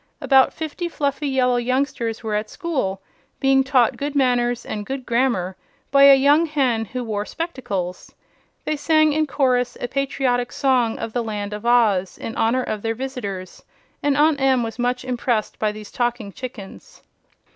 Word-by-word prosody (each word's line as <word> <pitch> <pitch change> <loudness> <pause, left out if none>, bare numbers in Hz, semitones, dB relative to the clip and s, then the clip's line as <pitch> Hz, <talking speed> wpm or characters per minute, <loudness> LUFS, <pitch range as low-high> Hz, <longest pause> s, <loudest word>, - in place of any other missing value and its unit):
About 265 -2 +4
fifty 325 +2 -5
fluffy 285 -2 -2
yellow 255 -2 +2
youngsters 245 -2 -1
were 220 -1 -3
at 210 +1 -1
school, 260 - -3 0.4
being 270 0 +4
taught 260 -3 +2
good 290 0 -4
manners 245 -3 +1
and 210 -1 -4
good 265 +3 -5
grammar 235 -7 0 0.4
by 275 0 +7
a 280 -1 +9
young 290 +5 +4
hen 255 -7 0
who 250 +3 -5
wore 210 -3 -2
spectacles. 210 - -5 0.5
They 305 - -1
sang 310 0 +3
in 310 +1 +1
chorus 255 -3 +1
a - - -3
patriotic 255 -2 -1
song 250 -4 +1
of 220 - -5
the 240 - -1
Land 210 -2 -4
of 210 +3 -5
Oz, 210 -7 +3
in 225 - -6
honor 245 +3 +1
of 215 -3 -4
their 225 +1 -2
visitors, 205 -8 -6 0.4
and 290 -1 +1
Aunt 295 -1 +3
Em 260 -2 +3
was 225 +1 -6
much 250 +1 -1
impressed 240 -3 -1
by 215 -1 +1
these 210 -1 -10
talking 240 -5 -2
chickens. 240 -5 -10
250 Hz, 165 wpm, -22 LUFS, 225-275 Hz, 0.5 s, a